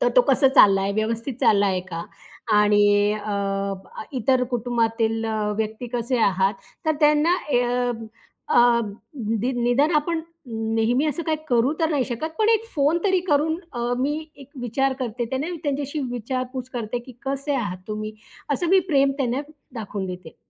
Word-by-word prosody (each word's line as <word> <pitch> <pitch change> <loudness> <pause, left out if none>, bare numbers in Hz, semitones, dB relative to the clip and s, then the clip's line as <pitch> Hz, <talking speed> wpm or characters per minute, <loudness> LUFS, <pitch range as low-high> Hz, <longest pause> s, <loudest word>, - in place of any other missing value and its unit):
तर - - +4
तो - - +8
कसा 270 - +5
चाललाय 195 -7 +5
व्यवस्थित 230 +4 -2
चाललाय 200 -6 +3
का? 165 0 -4 0.5
आणि 210 0 +5 0.3
अ, 200 -2 -2 0.4
इतर 255 +1 +2
कुटुंबातील 225 -2 0
अ, 215 -1 -1
व्यक्ती 220 +2 -3
कसे 240 +1 0
आहात? 195 -2 +2 0.3
तर 315 - +3
त्यांना 300 +3 +4
अ, 295 -8 0 1.0
अ, 240 -1 +6 0.6
दी 255 +2 0
निदान 250 +6 +3
आपण 320 +2 0 0.3
नेहमी 225 +4 +1
असं 320 +3 -2
काही 320 -1 0
करू 245 +3 +3
तर 320 - +3
नाही 285 -5 +1
शकत. 260 +6 -4
पण 435 0 +3
एक 450 -1 +3
फोन 295 +3 +3
तरी 380 -2 +3
करून 305 +2 +2 0.2
अ, 240 0 -2
मी 285 +4 0 0.2
एक 275 -2 -13
विचार 265 +3 0
करते 240 -1 -2
त्यांना 265 +5 -2 0.2
त्यांच्याशी 285 +1 -2
विचारपूस 255 +1 -4
करते, 240 -1 -3
की 240 +2 -12
"कसे 275 +2 -1
आहात 205 -8 -2
तुम्ही?" 215 0 -4 0.4
असं 335 +5 -1
मी 380 +2 +6
प्रेम 275 -3 +3
त्यांना 255 0 0 0.3
दाखवून 205 -4 -4
देते. 180 -3 -8
245 Hz, 155 wpm, -23 LUFS, 215-280 Hz, 1.0 s, तो